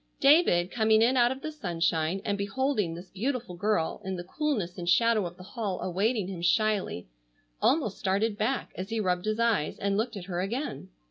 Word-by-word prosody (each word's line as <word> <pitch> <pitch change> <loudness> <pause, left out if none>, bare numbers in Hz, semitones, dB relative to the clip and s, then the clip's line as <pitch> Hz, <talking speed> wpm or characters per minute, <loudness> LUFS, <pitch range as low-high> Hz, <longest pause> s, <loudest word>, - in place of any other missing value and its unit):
David, 275 - +5
coming 220 -1 +4
in 250 +3 +3
out 240 -1 +4
of 265 +1 -6
the 310 - -3
sunshine 170 - -1
and 205 - 0
beholding 205 -2 -1
this 175 +2 -11
beautiful 240 0 -3
girl 200 -2 0
in 190 -1 -3
the 175 - -5
coolness 200 - -2
and 175 0 -2
shadow 225 -1 +3
of 175 +1 -11
the 185 - -11
hall 205 -1 -4
awaiting 200 +3 0
him 185 -3 -6
shyly, 200 - +1 0.5
almost 265 - +2
started 205 +2 +1
back 230 +5 -1
as 185 +1 -5
he 225 0 -1
rubbed 180 -2 0
his 215 +1 -1
eyes 230 -10 +1
and 200 0 0
looked 225 0 -1
at 180 - -7
her 180 -2 -2
again. 230 0 -4
205 Hz, 195 wpm, -28 LUFS, 180-235 Hz, 0.5 s, David